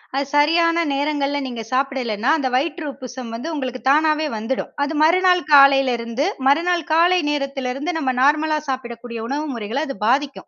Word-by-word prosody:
அது 280 Hz, +1 st, 0 dB
சரியான 335 Hz, +3 st, +3 dB
நேரங்கள்ல 285 Hz, 0 st, -1 dB
நீங்க 235 Hz, -3 st, -6 dB
சாப்பிடலேன்னா, 255 Hz, -3 st, -1 dB
அந்த 270 Hz, -3 st, -1 dB
வயிற்று 305 Hz, +4 st, -1 dB
உப்புசம் 255 Hz, -2 st, -9 dB
வந்து 245 Hz, +8 st, -6 dB
உங்களுக்கு 255 Hz, -4 st, -5 dB
தானாவே 310 Hz, +1 st, +2 dB
வந்துடும். 225 Hz, +5 st, -3 dB
அது 290 Hz, +3 st, -2 dB
மறுநாள் 360 Hz, +3 st, +4 dB
காலையில 275 Hz, -2 st, +6 dB
இருந்து, 235 Hz, +5 st, -3 dB, 0.2 s
மறுநாள் 340 Hz, +4 st, +2 dB
காலை 350 Hz, +3 st, +4 dB
நேரத்தில 275 Hz, -3 st, -3 dB
இருந்து 290 Hz, +6 st, -3 dB
நம்ம 265 Hz, -5 st, 0 dB
நார்மலா 305 Hz, +3 st, +2 dB
சாப்பிடக்கூடிய 235 Hz, -2 st, -5 dB
உணவு 290 Hz, +4 st, -3 dB
முறைகளை 230 Hz, +5 st, -3 dB
அது 275 Hz, -, -5 dB
பாதிக்கும். 275 Hz, +3 st, -1 dB
275 Hz, 155 wpm, -20 LUFS, 255-310 Hz, 0.2 s, காலையில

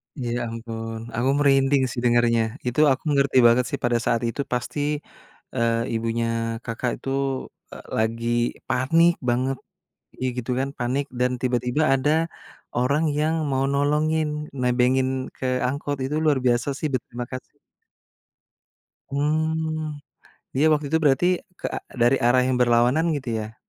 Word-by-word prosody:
Ya 120 Hz, -3 st, -2 dB
ampun. 115 Hz, 0 st, -6 dB
Aku 120 Hz, +3 st, +1 dB
merinding 135 Hz, -1 st, +4 dB
sih 125 Hz, -, -4 dB
dengernya, 120 Hz, -1 st, +2 dB
itu 125 Hz, +3 st, -1 dB
aku 135 Hz, -, -1 dB
mengerti 140 Hz, -2 st, +2 dB
banget 120 Hz, +2 st, +4 dB
sih -, -, -3 dB
pada 120 Hz, -1 st, +2 dB
saat 115 Hz, -, +1 dB
itu 120 Hz, +4 st, -1 dB
pasti, 125 Hz, +3 st, -3 dB, 0.8 s
eee, 115 Hz, 0 st, +1 dB
ibunya 115 Hz, +1 st, -1 dB, 0.4 s
Kakak 120 Hz, +2 st, -2 dB
itu, -, -, -5 dB, 0.6 s
eee, -, -, -10 dB
lagi 115 Hz, +1 st, -1 dB, 0.4 s
panik 165 Hz, +7 st, +4 dB, 0.2 s
banget 130 Hz, +2 st, 0 dB, 0.6 s
gi 130 Hz, -, +1 dB
gitu 125 Hz, +1 st, -3 dB
kan 135 Hz, +1 st, -1 dB
panik 130 Hz, +3 st, 0 dB
dan 125 Hz, 0 st, +2 dB
tiba-tiba 125 Hz, +3 st, 0 dB
ada 135 Hz, +2 st, +2 dB, 0.7 s
orang 140 Hz, +6 st, +2 dB, 0.2 s
yang 155 Hz, +1 st, +1 dB, 0.2 s
mau 135 Hz, 0 st, +1 dB
nolongin 150 Hz, +1 st, +1 dB, 0.2 s
nebengin 125 Hz, +1 st, +2 dB, 0.3 s
ke -, -, -5 dB, 0.2 s
angkot 145 Hz, +2 st, -3 dB
itu 145 Hz, +3 st, -2 dB
luar 150 Hz, -3 st, +3 dB
biasa 120 Hz, +1 st, +2 dB
sih -, -, -3 dB
berterima 120 Hz, -1 st, -3 dB
kasih. 130 Hz, -1 st, -8 dB, 1.5 s
Hmm, 155 Hz, +1 st, -1 dB, 0.6 s
dia 145 Hz, +4 st, +4 dB
waktu 150 Hz, -1 st, +1 dB
itu 160 Hz, -, +3 dB
berarti 140 Hz, +3 st, +4 dB, 0.3 s
ke -, -, -6 dB
a -, -, -3 dB, 0.2 s
dari 120 Hz, +3 st, +4 dB
arah 125 Hz, +1 st, +4 dB
yang 125 Hz, 0 st, 0 dB
berlawanan 120 Hz, +5 st, +3 dB
gitu 135 Hz, -4 st, -4 dB
ya? 110 Hz, +1 st, -7 dB
130 Hz, 140 wpm, -24 LUFS, 120-145 Hz, 1.5 s, merinding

